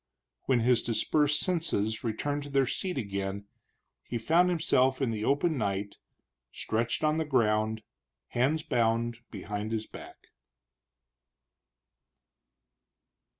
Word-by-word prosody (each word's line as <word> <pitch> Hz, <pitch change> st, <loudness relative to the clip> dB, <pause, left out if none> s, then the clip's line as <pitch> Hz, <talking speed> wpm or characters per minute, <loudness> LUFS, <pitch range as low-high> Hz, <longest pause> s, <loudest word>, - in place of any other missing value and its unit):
When 125 Hz, -3 st, +2 dB
his 120 Hz, 0 st, +3 dB
dispersed 145 Hz, +5 st, +2 dB
senses 135 Hz, -, 0 dB
returned 145 Hz, +6 st, -2 dB
to 145 Hz, -, -8 dB
their 135 Hz, -1 st, +3 dB
seat 180 Hz, +6 st, -3 dB
again, 100 Hz, -3 st, -3 dB, 0.6 s
he 120 Hz, -, -4 dB
found 165 Hz, +10 st, +3 dB
himself 135 Hz, -6 st, +2 dB
in 130 Hz, -4 st, 0 dB
the 110 Hz, -1 st, -3 dB
open 145 Hz, +4 st, +1 dB
night, 100 Hz, -1 st, -2 dB, 0.5 s
stretched 115 Hz, +5 st, -2 dB
on 155 Hz, 0 st, +2 dB
the 160 Hz, -, +1 dB
ground, 110 Hz, -6 st, +1 dB, 0.5 s
hands 145 Hz, +6 st, +1 dB
bound 115 Hz, -4 st, 0 dB
behind 105 Hz, +1 st, -5 dB
his 110 Hz, -1 st, -2 dB
back. -, -, -12 dB
120 Hz, 110 wpm, -29 LUFS, 110-145 Hz, 0.6 s, his